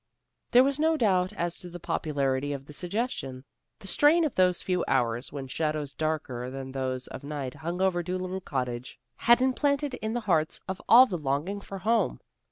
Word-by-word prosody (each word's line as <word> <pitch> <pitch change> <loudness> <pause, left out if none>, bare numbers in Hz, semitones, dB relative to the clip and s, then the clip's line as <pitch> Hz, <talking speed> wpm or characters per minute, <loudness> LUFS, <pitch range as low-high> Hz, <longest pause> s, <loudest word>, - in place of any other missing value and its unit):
There 250 +1 +7
was 275 +1 0
no 320 +1 +3
doubt 185 -7 +2
as 175 0 -3
to 180 - -9
the 175 0 -8
popularity 145 -4 -1
of 135 -1 -6
the 150 - -11
suggestion. 175 - -3 0.3
The 195 - -12
strain 310 - +4
of 295 - -1
those 180 -1 +2
few 180 -1 0
hours 120 -2 0
when 140 -2 -5
shadows 150 0 -2
darker 135 -5 -2
than 135 0 -6
those 130 -1 -3
of - - -8
night 140 -3 -4
hung 170 +4 -4
over 180 -2 +2
Dolittle 185 +2 -3
Cottage, 125 -6 -4 0.2
had 240 +2 +5
implanted 280 +1 +1
in 220 -3 -3
the 240 - -1
hearts 165 -7 +1
of 190 0 -4
all 250 +3 +10
the 180 -9 -4
longing 150 +8 -2
for 195 - -7
home. 225 +5 +1
175 Hz, 185 wpm, -28 LUFS, 135-215 Hz, 0.3 s, all